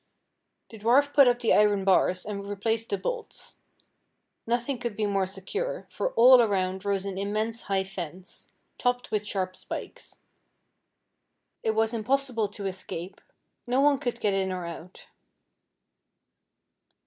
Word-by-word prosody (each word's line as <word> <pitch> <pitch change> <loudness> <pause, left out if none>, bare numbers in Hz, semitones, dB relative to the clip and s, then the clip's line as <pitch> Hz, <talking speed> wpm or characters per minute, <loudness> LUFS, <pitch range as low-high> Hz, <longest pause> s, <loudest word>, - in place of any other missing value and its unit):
The 220 - -11
dwarf 270 +7 +3
put 280 -3 +7
up 245 0 +2
the 230 - +3
iron 205 -2 +4
bars, 185 -1 +3
and 200 -1 -5
replaced 225 +3 -2
the 200 - 0
bolts. 470 - -6 0.9
Nothing 240 +2 -1
could 235 -3 -4
be 215 - -1
more 195 -2 0
secure, 420 - -4
for - - -2
all 250 +1 +8
around 190 -3 0
rose 200 -1 -1
an 195 -1 -4
immense 215 +3 -2
high 195 -1 +2
fence, 185 -1 -8 0.3
topped 245 -2 0
with 210 -1 -1
sharp 185 -2 -2
spikes. - - -8 1.4
It 220 -1 0
was 220 +1 +1
impossible 235 -1 0
to 200 0 -8
escape 185 -1 -6 0.5
no 250 +2 +2
one 285 -1 +4
could 245 -4 -3
get 205 -3 +1
in 190 -1 0
or 180 -1 -4
out. 170 +1 -9
210 Hz, 140 wpm, -27 LUFS, 195-240 Hz, 1.4 s, all